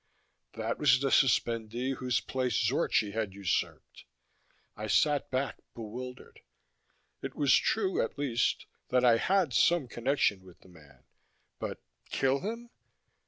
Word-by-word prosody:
That 115 +1 -3
was 130 -4 +5
the 135 0 0
suspendee 120 0 +1
whose 125 -1 0
place 130 -3 -2
Zorchi 105 -2 +1
had 105 -3 -3
usurped. 100 -3 -3 0.7
I 110 +1 -5
sat 145 +4 +2
back, 135 +1 -2 0.2
bewildered. 125 +3 -8 0.8
It - - -6
was 140 -3 +3
true, 195 -4 +1
at - - -3
least, 135 -5 0 0.2
that 125 0 +3
I 115 -2 +6
had - - -4
had 185 -6 +1
some 170 +1 +3
connection 120 -5 0
with 90 -2 -17
the - - -18
man. 75 -7 -19 0.6
But - - -6 0.3
kill 135 +1 +1
him? 230 - -6
125 Hz, 135 wpm, -30 LUFS, 110-140 Hz, 0.8 s, I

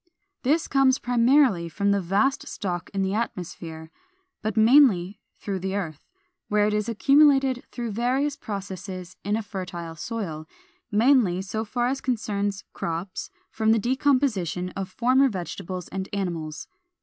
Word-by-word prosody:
This 310 +6 +1
comes 270 -1 +4
primarily 245 - +3
from 200 +4 0
the 200 0 +2
vast 200 +10 +1
stock 175 -4 -4
in 195 -1 -1
the 190 0 -1
atmosphere, 170 -7 -5 0.5
but 215 0 -3
mainly 220 -6 +5 0.2
through 195 -2 -4
the 190 +1 -3
earth, 160 -7 -5 0.4
where 210 0 +2
it 210 - +1
is 210 +2 0
accumulated 270 +1 +4
through 235 -2 -4
various 260 +6 0
processes 190 - -6
in 205 +2 0
a 225 - -2
fertile 180 -5 -6
soil, 160 -4 -5 0.4
mainly, 220 -4 +4
so 220 +3 -3
far 240 +2 -1
as 265 +2 -1
concerns 205 -5 -2
crops, 170 +3 -4 0.2
from 220 0 +2
the - - +3
decomposition 240 - +1
of 190 +1 -5
former 255 +7 +3
vegetables 185 -2 -5
and 190 0 -4
animals. 170 -6 -4
205 Hz, 140 wpm, -25 LUFS, 185-245 Hz, 0.5 s, mainly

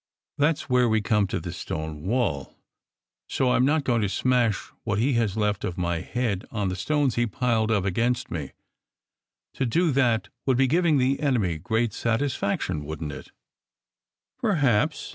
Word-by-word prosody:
That 150 +3 +4
s - - -7
where 125 -4 +2
we 110 0 +2
come 105 -1 +2
to - - -2
the 85 0 -6
stone 80 -2 -5
wall. 95 - -1 0.7
So 130 -2 +1
I - - +3
m 125 - +3
not 150 +2 +2
going 120 -3 +1
to 105 - 0
smash 120 +1 +1
what 100 - -1
he 130 +6 +2
has 110 -4 0
left 105 -2 0
of 90 - -3
my 85 -2 -1
head 110 -2 -2
on 105 -4 -2
the 90 - -3
stones 145 +5 +1
he 120 0 +1
piled 115 0 0
up 105 -4 +1
against 115 +6 0
me. 75 -5 -5 1.0
To 135 - -1
do 165 +7 +2
that 120 -7 +1 0.2
would 130 -2 +3
be 135 - +4
giving 160 +2 +3
the 135 +1 +2
enemy 110 - 0
great 115 +4 0
satisfaction, 115 - -1
wouldn 80 +1 -5
t 70 - -6
it?" - - -13 1.1
"Perhaps!" 145 - +1
115 Hz, 180 wpm, -25 LUFS, 95-130 Hz, 1.1 s, That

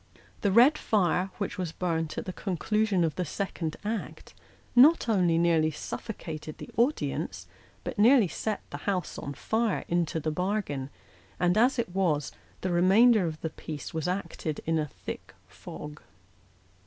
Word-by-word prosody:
The 200 - +2
red 250 +9 +6
fire, 190 -2 +1
which 200 -1 -4
was 175 -3 -2
burnt 165 -2 -2
at - - -3
the 185 - -5
conclusion 200 +1 0
of 160 -2 +1
the 180 - 0
second 170 -2 -4
act, 220 0 -4 0.4
not 280 +3 +7
only 180 -7 +3
nearly 165 -2 +3
suffocated 155 -1 -6
the - - -9
audience, 250 +7 0 0.4
but - - -5
nearly 235 -1 +6
set 215 +5 -3
the - - -4
house 185 -3 -2
on 140 0 -6
fire 220 - 0
into 170 -2 0
the 155 0 -2
bargain; 180 -6 -2 0.5
and, 180 0 +3
as 245 +5 +4
it 225 -7 -2
was, 160 -7 +1 0.3
the 185 - -1
remainder 195 +4 +5
of 155 -1 -6
the 160 - -3
piece 150 -3 -7
was 160 +1 -2
acted 170 -4 -3
in 165 0 +1
a 150 - -1
thick - - -9
fog. 150 0 -10
180 Hz, 155 wpm, -28 LUFS, 160-215 Hz, 0.5 s, not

